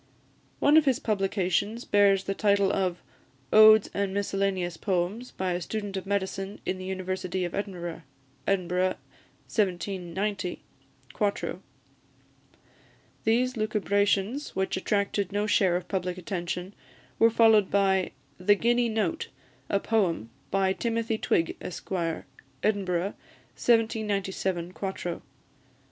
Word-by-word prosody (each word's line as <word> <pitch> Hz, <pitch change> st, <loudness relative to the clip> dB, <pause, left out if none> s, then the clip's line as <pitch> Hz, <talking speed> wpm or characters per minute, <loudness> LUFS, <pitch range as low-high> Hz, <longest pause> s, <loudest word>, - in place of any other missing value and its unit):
One 295 Hz, +2 st, +5 dB
of 315 Hz, -, +5 dB
his 265 Hz, -3 st, +3 dB
publications 200 Hz, +1 st, 0 dB
bears 200 Hz, -2 st, +4 dB
the 195 Hz, -, -2 dB
title 200 Hz, -1 st, +2 dB
of 185 Hz, -2 st, -1 dB, 0.5 s
"Odes 215 Hz, 0 st, +8 dB
and 200 Hz, -1 st, -1 dB
Miscellaneous 195 Hz, -3 st, -1 dB
Poems, 190 Hz, +7 st, -1 dB
by 185 Hz, -1 st, -2 dB
a 175 Hz, +1 st, -2 dB
Student 205 Hz, +2 st, -4 dB
of 190 Hz, 0 st, -4 dB
Medicine 195 Hz, 0 st, -2 dB
in 185 Hz, -, -2 dB
the 185 Hz, -, -6 dB
University 185 Hz, -1 st, -2 dB
of 175 Hz, -, -5 dB
Edinburgh," 180 Hz, -4 st, -4 dB, 0.5 s
Edinburgh, 185 Hz, -1 st, +1 dB, 0.5 s
1790, 190 Hz, -1 st, -2 dB, 0.5 s
4to. 205 Hz, -2 st, -1 dB, 1.7 s
These 250 Hz, +3 st, +2 dB
lucubrations, 210 Hz, +3 st, 0 dB
which 190 Hz, 0 st, 0 dB
attracted 200 Hz, 0 st, 0 dB
no 205 Hz, +1 st, 0 dB
share 190 Hz, -4 st, +3 dB
of 180 Hz, 0 st, -3 dB
public 180 Hz, -2 st, -2 dB
attention, 180 Hz, +1 st, -4 dB, 0.5 s
were 230 Hz, -, +7 dB
followed 220 Hz, -3 st, +5 dB
by 190 Hz, -2 st, +2 dB, 0.3 s
"The 205 Hz, +3 st, +4 dB
Guinea 240 Hz, +3 st, +2 dB
Note, 215 Hz, -6 st, -1 dB, 0.4 s
a 200 Hz, -, +2 dB
Poem, 180 Hz, -, 0 dB, 0.2 s
by 190 Hz, -1 st, +2 dB
Timothy 230 Hz, 0 st, -1 dB
Twig, 165 Hz, -, +1 dB
Esquire," 170 Hz, -2 st, -3 dB, 0.4 s
Edinburgh, 195 Hz, -3 st, 0 dB, 0.4 s
1797, 195 Hz, -6 st, 0 dB
4to. 190 Hz, -3 st, -4 dB
195 Hz, 115 wpm, -27 LUFS, 185-210 Hz, 1.7 s, Odes